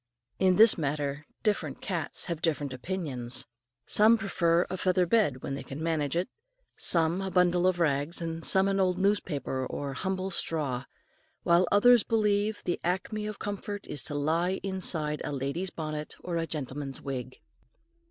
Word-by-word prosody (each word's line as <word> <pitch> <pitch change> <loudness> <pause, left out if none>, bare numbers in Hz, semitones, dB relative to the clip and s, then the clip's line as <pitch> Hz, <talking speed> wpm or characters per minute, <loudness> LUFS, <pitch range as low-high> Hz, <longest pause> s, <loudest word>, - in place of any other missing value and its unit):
In 185 -1 +4
this 220 -2 +7
matter 145 0 -2 0.2
different 180 - -1
cats 170 -6 -3
have 170 -2 -4
different 145 -5 -1
opinions. 130 -5 -4 0.4
Some 220 +2 +5
prefer 175 -5 +1
a - - -4
feather 185 0 +2
bed 175 - +1
when 135 - -3
they 135 - -4
can 135 - -8
manage 155 -3 -1
it, 175 +2 0 0.5
some 165 +2 +3
a 190 - -2
bundle 180 -1 +3
of 185 -1 +1
rags, 150 0 +1 0.2
some 190 +3 +5
an 195 0 +1
old 185 -1 +2
newspaper 165 -9 0
or 140 +1 -4
humble 190 +5 -3
straw, 145 -7 -1 0.6
while 170 +1 +4
others 240 +3 +6
believe 210 -1 +1
the 175 - -1
acme 205 +4 -2
of 215 -1 -5
comfort 205 0 -5
is 145 - -3
to 150 - -3
lie 165 +6 0
inside 170 -6 0
a - - -3
lady's 140 +7 -2
bonnet 155 -2 -5
or 175 - -3
a 165 0 -1
gentleman's 140 -2 -5
wig. 130 -2 -6
170 Hz, 160 wpm, -29 LUFS, 145-190 Hz, 0.6 s, this